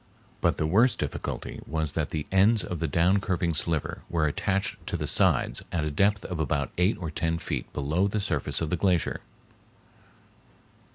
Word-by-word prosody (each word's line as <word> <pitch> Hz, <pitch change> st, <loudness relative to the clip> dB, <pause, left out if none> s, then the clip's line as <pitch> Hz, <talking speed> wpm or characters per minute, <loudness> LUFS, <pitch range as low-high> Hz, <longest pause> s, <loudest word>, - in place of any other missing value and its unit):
But -, -, +2 dB
the 80 Hz, -, 0 dB
worst 110 Hz, +11 st, +4 dB
difficulty -, -, -4 dB
was 80 Hz, -1 st, -1 dB
that 80 Hz, 0 st, -1 dB
the 75 Hz, -2 st, -3 dB
ends 100 Hz, +2 st, +4 dB
of 85 Hz, -1 st, -4 dB
the 80 Hz, -, 0 dB
down 85 Hz, +7 st, +3 dB
curving 90 Hz, -3 st, 0 dB
sliver 80 Hz, 0 st, -1 dB
were 80 Hz, -2 st, +1 dB
attached 100 Hz, +5 st, 0 dB
to 95 Hz, -4 st, -1 dB
the 75 Hz, -, -3 dB
sides -, -, +3 dB
at 85 Hz, -3 st, 0 dB
a 75 Hz, -, -1 dB
depth 100 Hz, +6 st, +2 dB
of 90 Hz, -3 st, -4 dB
about 70 Hz, -3 st, -1 dB
eight 90 Hz, +5 st, +3 dB
or 80 Hz, -3 st, -5 dB
ten 80 Hz, +1 st, -1 dB
feet -, -, -4 dB
below 80 Hz, +7 st, 0 dB
the 105 Hz, +1 st, -1 dB
surface 85 Hz, -9 st, -2 dB
of 80 Hz, -, -2 dB
the 90 Hz, -, +1 dB
glacier. 90 Hz, -2 st, +1 dB
85 Hz, 180 wpm, -27 LUFS, 80-95 Hz, -, worst